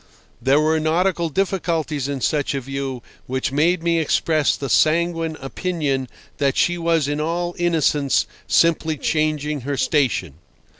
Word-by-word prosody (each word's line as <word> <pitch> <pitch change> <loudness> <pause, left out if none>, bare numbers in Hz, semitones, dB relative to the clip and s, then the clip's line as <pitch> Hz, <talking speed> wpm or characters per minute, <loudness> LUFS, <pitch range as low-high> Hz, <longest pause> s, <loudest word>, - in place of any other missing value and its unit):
There 135 +2 +3
were 155 +1 +2
nautical 170 +2 +1
difficulties 165 -6 -1
in 140 -2 -4
such 145 0 0
a 135 - -2
view 135 -1 -5 0.2
which 130 +2 -2
made 165 +5 +2
me 170 -1 +2
express 155 -1 +1
the 140 - -4
sanguine 165 +2 +2
opinion 140 -2 -2 0.3
that 140 -2 +1
she 175 - +2
was 165 -3 +1
in 145 +1 -1
all 175 +2 -2
innocence 155 -5 +2 0.2
simply 160 -2 +2
changing 150 -1 -1
her 140 +2 -3
station. 130 - +1
155 Hz, 140 wpm, -21 LUFS, 140-165 Hz, 0.3 s, There